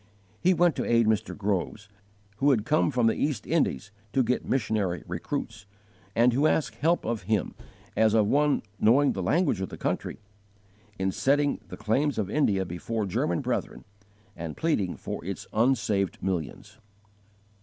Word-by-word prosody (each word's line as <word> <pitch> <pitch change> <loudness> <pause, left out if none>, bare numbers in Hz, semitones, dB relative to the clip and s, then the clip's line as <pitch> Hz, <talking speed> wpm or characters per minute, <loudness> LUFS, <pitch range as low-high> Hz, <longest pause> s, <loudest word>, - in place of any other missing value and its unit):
He 185 +1 +3
went 175 -1 +3
to - - 0
aid 115 -1 +3
Mr. 110 -1 0
Groves, 105 +1 -2 0.5
who 140 +5 +3
had 115 -6 +2
come 150 +5 +2
from 125 -4 +1
the 115 - +4
East 140 -8 -2
Indies 140 - 0 0.2
to 130 - +3
get 125 +2 0
missionary 105 -8 0
recruits, 110 - -5 0.5
and 120 +1 +4
who 140 +5 +3
asked 135 -8 +1
help 165 +6 +1
of 115 -1 -2
him, 105 -3 0 0.4
as 110 0 +3
of 110 -2 +4
one 145 +6 +2 0.2
knowing 135 +6 +4
the 95 - -3
language 110 - +1
of 95 - -3
the - - -8
country, - - -2 0.8
in 95 0 0
setting 145 +6 +1
the - - -9
claims 130 +7 0
of 100 -2 -2
India 100 -11 +2
before 105 +5 -3
German 85 -2 -1
brethren, - - -3 0.5
and 80 -2 -6
pleading 110 - 0
for - - -6
its 95 +2 -5
unsaved 110 -5 +1
millions. 90 -5 -4
110 Hz, 160 wpm, -27 LUFS, 100-140 Hz, 0.8 s, the